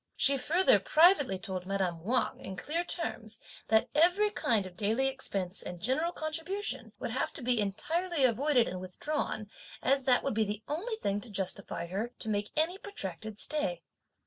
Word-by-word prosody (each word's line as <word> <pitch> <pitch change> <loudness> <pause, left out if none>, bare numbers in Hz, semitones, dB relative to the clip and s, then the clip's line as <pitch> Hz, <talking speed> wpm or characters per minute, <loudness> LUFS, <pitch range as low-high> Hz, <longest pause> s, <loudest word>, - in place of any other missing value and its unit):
She 280 - +4
further 340 +8 +4
privately 310 - +4
told 185 -2 -4
madame 185 -4 -2
Wang 245 +6 0
in 190 - -7
clear 310 - -2
terms, 230 -11 -2 0.3
that 220 0 +3
every 360 +7 +4
kind 225 - +1
of 185 -1 -10
daily 220 +7 +1
expense 195 -8 -1
and 180 - -7
general 265 - +1
contribution 325 +6 -2
would - - -4
have - - -1
to 315 - -8
be 245 -1 +3
entirely 320 - -1
avoided 255 +1 +3
and 185 - -5
withdrawn 215 +3 -3 0.3
as 270 0 +2
that 250 -2 +4
would 275 - -1
be 220 +1 +2
the 210 +1 -5
only 385 +11 -3
thing 205 - -2
to 245 - -11
justify 190 -3 -1
her 205 +8 -4
to 220 - -5
make 205 0 -1
any 340 +5 +1
protracted 215 - -4
stay. 185 - 0
240 Hz, 170 wpm, -30 LUFS, 195-310 Hz, 0.3 s, She